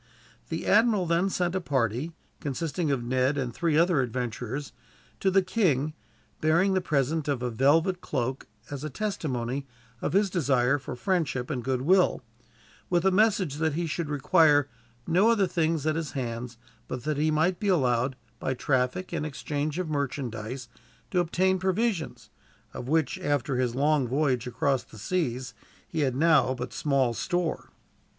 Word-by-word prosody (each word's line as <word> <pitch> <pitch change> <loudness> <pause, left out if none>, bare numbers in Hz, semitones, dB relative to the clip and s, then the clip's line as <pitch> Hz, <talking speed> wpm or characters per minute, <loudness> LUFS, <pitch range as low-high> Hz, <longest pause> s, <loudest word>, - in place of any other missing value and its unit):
The - - -3
admiral 210 -2 +4
then 170 +3 +2
sent 180 -2 0
a 190 - -1
party, 135 0 -1 0.3
consisting 150 +3 -2
of 135 -4 0
Ned 130 +3 +1
and 125 -4 -2
three 165 0 +1
other 170 -3 +4
adventurers, 125 +2 -4 0.5
to 195 - +2
the 190 0 +4
king; 155 - +1 0.5
bearing 170 +5 +3
the 185 - +2
present 155 -1 0
of 135 -4 -1
a 125 - -1
velvet 160 - +3
cloak, 130 -1 -3 0.2
as 145 0 -5
a 155 - -3
testimony 140 - -3 0.3
of - - -2
his 200 0 +3
desire 140 -5 +2
for 130 - -6
friendship 150 -6 -1
and 125 -5 -3
goodwill; 135 +8 +2 0.7
with 175 -1 +2
the 190 - +4
message 195 -7 +2
that 160 -1 0
he 170 +1 -1
should 160 -1 -3
require 145 0 +4 0.4
no 185 +7 +4
other 220 -4 +4
thing 165 -3 0
at 155 -1 +1
his 160 -2 -3
hands 120 -2 -4 0.3
but 125 -2 -5
that 150 0 -1
he 155 +2 +2
might 160 +4 +1
be 205 - -2
allowed, 130 -7 +2 0.2
by 130 - -1
traffic 130 +8 0
and 160 -3 -1
exchange 150 +1 -3
of 185 -2 -2
merchandise, 130 -4 -3 0.4
to 180 - +2
obtain 185 +2 +2
provisions; 190 - -1 0.4
of 120 - -6
which, 155 -2 +1
after 145 -2 0
his 125 -2 0
long 145 -1 +2
voyage 130 -2 0
across 130 +1 0
the - - -15
seas, 130 - -2 0.3
he 160 - -4
had 135 -4 +1
now 145 -4 +4
but 125 0 -6
small 135 -5 +1
store. 175 +5 -2
150 Hz, 160 wpm, -27 LUFS, 130-175 Hz, 0.7 s, admiral